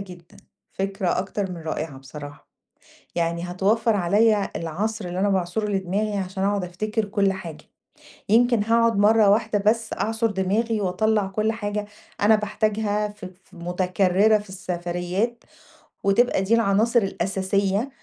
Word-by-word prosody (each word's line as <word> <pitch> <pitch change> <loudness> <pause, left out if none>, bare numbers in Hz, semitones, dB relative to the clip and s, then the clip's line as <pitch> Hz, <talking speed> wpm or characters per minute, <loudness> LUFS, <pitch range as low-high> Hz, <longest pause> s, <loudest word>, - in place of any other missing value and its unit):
جدًا، 180 -3 -12 0.4
فكرة 195 -2 -1
أكتر 190 +1 -3
من 180 - -6
رائعة 155 -3 -4
بصراحة، 145 +2 -11 0.7
يعني 170 0 -1
هتوفّر 215 +5 +2
عليَّ 205 +3 +3
العصْر 205 +7 -3
اللي 175 +1 -4
أنا 205 - +2
باعْصُره 190 +2 -1
لدماغي 200 +2 -1
عشان 190 0 -4
أقعد 200 -1 0
أفتكر 215 +5 -2
كُلّ 200 -1 +1
حاجة، 170 -5 -8 0.7
يمكن 235 0 +4
هاقعد 230 0 +3
مَرّة 210 0 +5
واحدة 215 0 +2
بس 220 +3 +1
أعْصُر 225 +1 0
دماغي 210 +3 0
وأطلّع 205 +2 +1
كُلّ 215 +3 0
حاجة 210 -2 -3 0.4
أنا 215 +2 +6
باحتاجها 210 0 -1
ف 205 -2 -10
ف 185 0 -15
مُتكرِّرة 185 +4 +2
في 205 -1 -10
السفريات 180 +4 -3 0.6
وتبقى 200 +2 +3
دي 195 +4 0
العناصر 230 +2 +3
الأساسية 195 +3 -1
200 Hz, 135 wpm, -23 LUFS, 185-215 Hz, 0.7 s, أنا